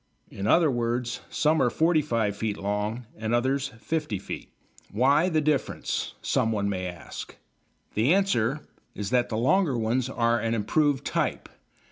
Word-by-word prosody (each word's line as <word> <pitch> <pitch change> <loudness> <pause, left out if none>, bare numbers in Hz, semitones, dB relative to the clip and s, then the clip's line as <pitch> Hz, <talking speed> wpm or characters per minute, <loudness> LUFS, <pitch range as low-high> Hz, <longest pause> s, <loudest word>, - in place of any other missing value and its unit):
In 100 +1 -4
other 160 +5 +5
words, 120 0 -1
some 155 +1 +2
are 125 - +4
45 145 -10 +1
feet 105 0 -2
long 105 +4 -2
and 110 +2 0
others 135 +3 +1
50 150 -1 -2
feet. 95 - -7 0.4
Why 140 - +3
the 160 -3 +2
difference? 150 -2 -1
someone 110 -3 +1
may 95 -2 -2
ask. 85 -3 -8 0.6
The 115 +8 +2
answer 150 - +2 0.3
is 105 +1 -4
that 125 -1 +2
the 110 - -2
longer 140 - +2
ones 120 +3 0
are 120 -2 +1
an 115 +1 0
improved 140 +6 +1
type. - - -1
120 Hz, 145 wpm, -26 LUFS, 110-145 Hz, 0.6 s, other